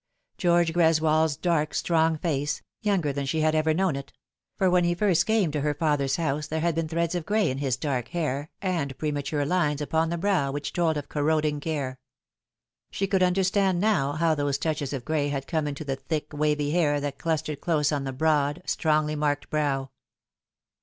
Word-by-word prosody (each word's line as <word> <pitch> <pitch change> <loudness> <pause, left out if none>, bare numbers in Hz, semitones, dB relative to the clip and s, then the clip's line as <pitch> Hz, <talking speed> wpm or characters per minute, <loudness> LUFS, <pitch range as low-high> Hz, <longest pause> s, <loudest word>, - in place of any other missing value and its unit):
George 170 -2 +3
Greswold's 160 -2 +3
dark, 165 -4 0
strong 160 -1 +2
face, 150 -3 -2 0.2
younger 185 -9 +1
than 140 0 -3
she 155 +3 0
had 155 0 +2
ever 155 0 +2
known 180 -1 +1
it; 140 0 -7 0.5
for 190 - +2
when 180 0 +4
he 175 0 +1
first 175 -3 +2
came 220 -7 +2
to 150 -1 -2
her 150 0 0
father's 145 -3 +1
house 150 -2 -1
there 160 - -2
had 170 0 +1
been 165 0 -1
threads 170 +1 -1
of 175 -2 -2
gray 205 -1 +1
in 130 - -4
his 135 -4 0
dark 130 -4 -2
hair 155 -4 -2
and 160 -8 -1
premature 145 -1 -2
lines 150 -3 +1
upon 160 +2 0
the 170 - -2
brow 180 -7 +1
which 145 +1 -4
told 165 -3 +1
of 145 - -5
corroding 150 0 0
care. 140 -4 -3 0.9
She 195 - -2
could 195 -1 +1
understand 190 0 +2
now 165 -9 +2
how 160 +1 +2
those 145 -2 0
touches 150 -2 -2
of 135 -4 -5
gray 155 -2 0
had 140 -1 -3
come 155 0 -1
in 145 - -3
the 140 -2 -3
thick 155 +3 -4
wavy 150 -1 0
hair 150 -4 +2
that 145 -1 -4
clustered 155 -3 -2
close 150 -3 +1
on 145 -2 -1
the 135 - -3
broad, 150 +2 +1
strongly 155 -2 +1
marked 145 -1 -1
brow. 140 -4 -1
155 Hz, 195 wpm, -26 LUFS, 145-170 Hz, 0.9 s, when